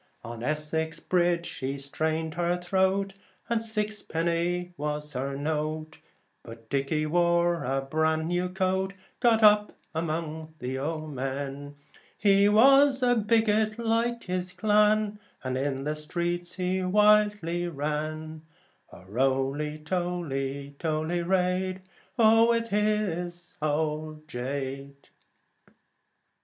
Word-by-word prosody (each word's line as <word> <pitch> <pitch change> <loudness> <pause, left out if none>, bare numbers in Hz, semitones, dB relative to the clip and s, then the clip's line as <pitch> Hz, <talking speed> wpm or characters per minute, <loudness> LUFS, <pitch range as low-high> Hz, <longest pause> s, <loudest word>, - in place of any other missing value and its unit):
On 115 -1 -7
Essex 155 +3 -2
Bridge 175 -1 +1
she 135 -2 -4
strained 155 +3 -2
her 175 0 0
throat, 190 +2 +1 0.4
And 230 -1 +1
six 215 -1 -3
a - - -26
penny 170 +2 -1
was 150 -1 -4
her 135 +2 -3
note. 155 +1 -3 0.4
But 115 -1 -13
Dickey 140 +3 0
wore 170 +1 +2
a 135 +2 0
bran 160 +3 0
new 175 +1 0
coat, 190 +1 0
He - - -27 0.2
got 215 -3 +5 0.2
among 160 -1 -3
the 125 -4 -5
yeomen. 140 -1 -4 0.4
He 200 0 +5
was 270 +4 +6
a 245 -1 +5
bigot, 220 -1 +2
like 235 +1 0
his 180 0 -3
clan, 210 +1 +2 0.2
And 130 -1 -2
in 135 0 -1
the 150 +1 -2
streets 175 +3 -3
he 185 0 -1
wildly 205 -3 +3
sang, 155 +1 -3 0.5
O - - -13
Roly, 135 +7 0
toly, 150 -5 -3
toly 160 +2 -1
raid, 185 +1 0 0.4
with 230 0 +4
his 185 -5 -1
old 155 0 -2
jade. 140 +1 -5
170 Hz, 110 wpm, -27 LUFS, 150-195 Hz, 0.5 s, was